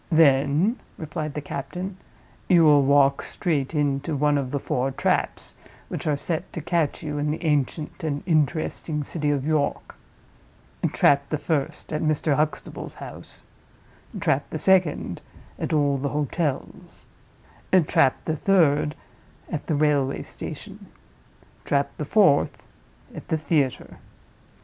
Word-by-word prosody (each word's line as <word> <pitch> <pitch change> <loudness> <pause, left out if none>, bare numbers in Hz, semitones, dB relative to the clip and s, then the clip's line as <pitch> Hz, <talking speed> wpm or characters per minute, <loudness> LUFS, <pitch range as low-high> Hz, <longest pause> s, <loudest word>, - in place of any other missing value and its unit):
"Then," 155 - +4 0.2
replied 155 -2 -5
the 150 - -2
captain, 180 +8 -5 0.5
"you 175 -3 +6
will 150 -2 +6
walk 140 0 +4
straight 155 -4 -2
into 145 +1 0
one 145 +1 +2
of 140 -3 -1
the 140 - -1
four 130 0 -1
traps 135 - -1 0.3
which - - -4
are 150 -2 +2
set 165 +4 -3
to - - -4
catch 165 -1 -1
you 150 -1 -3
in 150 +1 0
the 155 +3 -3
ancient 150 +1 -1
and 145 -2 -2
interesting 155 -1 0
city 150 0 -2
of 140 -2 0
York. 155 -2 -1 1.0
Trap 140 0 +3
the 155 - 0
first, 150 0 -2
at 155 - -1
Mr. 155 -1 +1
Huxtable's 155 +1 -3
house; - - -11 0.7
trap 140 +2 0
the - - -4
second, 170 - +2 0.4
at - - -3
all 145 -3 +2
the 140 +1 -1
hotels; 150 0 -3 0.8
trap 135 -2 +2
the 160 - 0
third, 150 -4 +3 0.6
at 155 -4 -4
the 155 - +1
railway 145 -2 +1
station; - - -9 0.8
trap 140 0 0
the 150 - -3
fourth, 185 -4 +3 0.5
at - - -9
the 160 - 0
theater. 145 -4 -1
150 Hz, 135 wpm, -24 LUFS, 140-160 Hz, 1.0 s, you